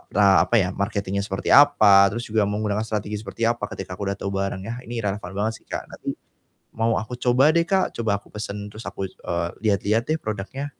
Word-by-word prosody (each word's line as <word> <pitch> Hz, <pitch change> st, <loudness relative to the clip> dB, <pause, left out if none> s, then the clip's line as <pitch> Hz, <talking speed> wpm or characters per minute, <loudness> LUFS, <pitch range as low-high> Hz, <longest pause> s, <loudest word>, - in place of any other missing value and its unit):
a 100 Hz, -2 st, +6 dB
apa -, -, +1 dB
ya 90 Hz, -3 st, +1 dB
marketing-nya 100 Hz, -1 st, -2 dB
seperti 95 Hz, -2 st, -2 dB
apa, 105 Hz, -9 st, +7 dB
terus 115 Hz, +3 st, -4 dB
juga 110 Hz, -1 st, +2 dB
menggunakan 105 Hz, 0 st, -1 dB
strategi 105 Hz, -1 st, -3 dB
seperti 105 Hz, +2 st, -6 dB
apa, 115 Hz, -3 st, -1 dB
ketika 90 Hz, -1 st, -6 dB
aku 100 Hz, -, -3 dB
udah -, -, -3 dB
tahu 100 Hz, -, -3 dB
barengnya, 100 Hz, +4 st, -3 dB
ini 115 Hz, -2 st, -4 dB
relevan 100 Hz, -2 st, -3 dB
banget 110 Hz, +3 st, 0 dB
sih -, -, -43 dB
Kak. -, -, -4 dB
Nanti -, -, -5 dB, 0.6 s
mau 115 Hz, 0 st, +1 dB
aku 110 Hz, +3 st, -6 dB
coba 125 Hz, +4 st, +4 dB
deh 170 Hz, -, +4 dB
Kak. 190 Hz, -1 st, +1 dB
Coba 110 Hz, -3 st, 0 dB
aku -, -, -23 dB
pesen 105 Hz, -1 st, -5 dB
terus 110 Hz, +2 st, -10 dB
aku, 95 Hz, -, -4 dB
eee, 85 Hz, -2 st, -4 dB
lihat-lihat 105 Hz, +2 st, +2 dB
deh 160 Hz, -, +2 dB
produknya. 110 Hz, +7 st, -4 dB
105 Hz, 205 wpm, -23 LUFS, 100-115 Hz, 0.6 s, apa